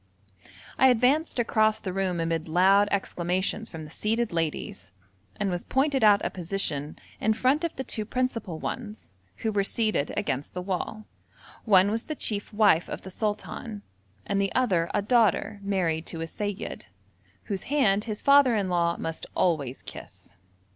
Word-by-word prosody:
I 265 - +7
advanced 260 +6 +2
across 220 -2 +2
the 185 -4 -5
room 185 -2 -1
amid 165 0 -1
loud 190 +5 +4
exclamations 190 +2 -1
from 160 -2 -8
the 150 - -11
seated 225 +3 -1
ladies, 150 - -3 0.5
and 200 -2 0
was 175 0 -3
pointed 270 -1 +1
out 205 -1 +5
a - - -1
position 165 -5 -2 0.2
in 220 - +2
front 265 +8 +1
of 335 - -2
the 265 - -4
two 225 -3 -2
principal 230 -6 -2
ones, 215 - -6 0.2
who 220 - -1
were 200 -1 +1
seated 215 -8 0
against 145 -9 -2
the 180 - -2
wall 200 +3 -4 0.6
one 200 -2 +5
was 225 +2 -2
the 310 - -3
chief 205 -6 -3
wife 205 -6 +3
of - - -6
the 190 - -9
sultan, 210 +1 -4 0.4
and 200 0 0
the 195 - 0
other 185 -10 +2
a 205 - 0
daughter 215 -2 +2
married 175 -5 -1
to 165 - -5
a - - -2
seyyid, 205 +4 -5 0.6
whose 195 -3 -4
hand 215 -8 +3
his 215 -2 -5
father 280 -4 +6
in 200 -3 0
law 170 -1 +1
must 165 0 -5
always 150 -8 0
kiss. - - -11
200 Hz, 165 wpm, -27 LUFS, 175-225 Hz, 0.6 s, I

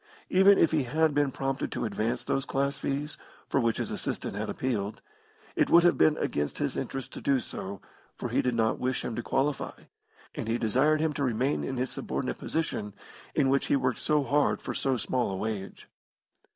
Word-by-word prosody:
Even 195 +2 +7
if 165 - +4
he 155 -5 +1
had 155 +4 +2
been 145 -1 +2
prompted 135 +1 -2
to - - -2
advance 110 +1 -1
those 135 - 0
class 140 +1 0
fees, 145 +2 -3 0.3
for - - +1
which 115 -3 +1
his - - -2
assistant - - -3
had - - -3
appealed, 110 -5 -2 0.6
it - - +2
would 170 0 +7
have 175 - +5
been 155 -1 +4
against 75 0 -1
his - - -1
interests 135 -1 -4
to - - -8
do 140 -1 +3
so, 100 -4 -6 0.4
for - - -4
he - - +2
did 125 -1 0
not 110 -1 +1
wish 130 0 -1
him 115 - -3
to 120 - -2
qualify, 135 +4 -1 0.5
and - - -5
he 115 +1 +1
desired 135 +8 +2
him 160 -1 +1
to 145 - -2
remain 130 +3 +1
in 130 - -3
his 130 +1 -1
subordinate - - -3
position, 105 -10 -2 0.4
in 145 -3 +3
which 135 +1 +2
he - - +3
worked 130 -3 0
so 150 -2 +2
hard 145 +2 +2
for - - -5
so 135 -2 0
small 125 0 0
a 95 - -3
wage. 105 -2 -5
135 Hz, 205 wpm, -29 LUFS, 115-145 Hz, 0.6 s, Even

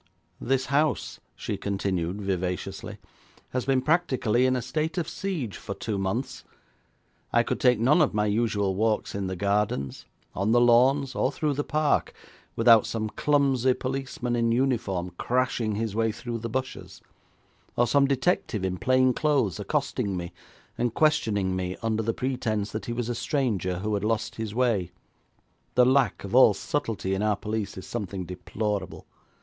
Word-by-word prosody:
'This 130 0 +1
house,' 150 +2 0 0.2
she - - -4
continued 95 -2 -2
vivaciously, 95 +2 -3 0.5
'has 125 -2 -2
been 130 -1 +2
practically 130 -7 +2
in 130 - +2
a - - 0
state 155 +6 -2
of 170 -3 -1
siege 175 - -4
for 100 - -6
two 110 - -3
months. 100 +7 -3 0.9
I 120 - +4
could - - -2
take 125 -3 +4
none 140 +9 +4
of 150 - +3
my 105 0 +1
usual 105 -2 +1
walks 110 +2 0
in 100 -1 -2
the 95 - -3
gardens, 100 - -1 0.3
on 100 +4 0
the 120 - +5
lawns, 130 +3 +4
or 130 - +1
through 150 0 -1
the 145 +2 -1
park, 155 -1 +1 0.4
without 115 -1 +6
some 110 -1 -2
clumsy 135 -2 +2
policeman 130 -2 -3
in 115 -1 +1
uniform 115 -8 0
crashing 120 -3 0
his 110 -1 -2
way 115 0 +1
through 120 +1 -5
the 115 +1 -5
bushes, 130 +3 -5 0.7
or 120 - +3
some 140 +3 +3
detective 135 - 0
in 90 -1 -2
plain 130 0 +3
clothes 135 - +1
accosting 125 -3 -1
me 85 0 -6 0.5
and 120 -1 0
questioning 105 -11 +2
me 90 0 -3
under 110 -1 0
the 115 +1 0
pretence 110 -6 -2
that 110 -2 -5
he - - -2
was 120 -1 -2
a 120 - -1
stranger 115 - -1
who 105 +4 -2
had 100 -1 -1
lost 110 +1 -1
his 110 -1 -4
way. 115 -8 +1 0.9
The 125 - +6
lack 130 -3 +2
of 100 - -7
all 125 -5 +7
subtlety 110 -7 -2
in 95 - -1
our 105 -1 +2
police 105 0 -4
is 95 - -7
something 100 -5 -4
deplorable. 100 +4 -4
115 Hz, 165 wpm, -26 LUFS, 100-130 Hz, 0.9 s, all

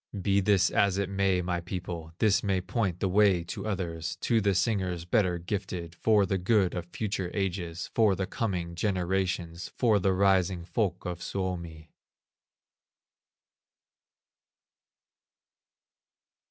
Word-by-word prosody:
Be 100 +1 +2
this 95 -1 +3
as 100 -2 +2
it 100 -2 -1
may, 95 -2 +1
my 90 0 -1
people, 85 -2 -6
This 105 -3 +3
may 95 -2 +1
point 95 -1 -2
the 95 - +2
way 95 -2 +4
to 85 - -6
others, 85 -5 -3
To 115 -2 +2
the 100 -1 +2
singers 90 -3 0
better 90 -2 +2
gifted, 90 -2 -4
For 105 +3 +3
the 95 0 -1
good 95 0 +2
of 85 -1 -4
future 100 -1 -3
ages, 90 -3 -3
For 110 -4 +4
the 95 +1 -2
coming 95 -8 -3
generations, 90 -2 -1
For 110 -5 +3
the 95 0 +2
rising 95 -2 +2
folk 95 -3 -1
of 90 -1 -4
Suomi. 85 -5 -4
95 Hz, 125 wpm, -28 LUFS, 90-100 Hz, -, way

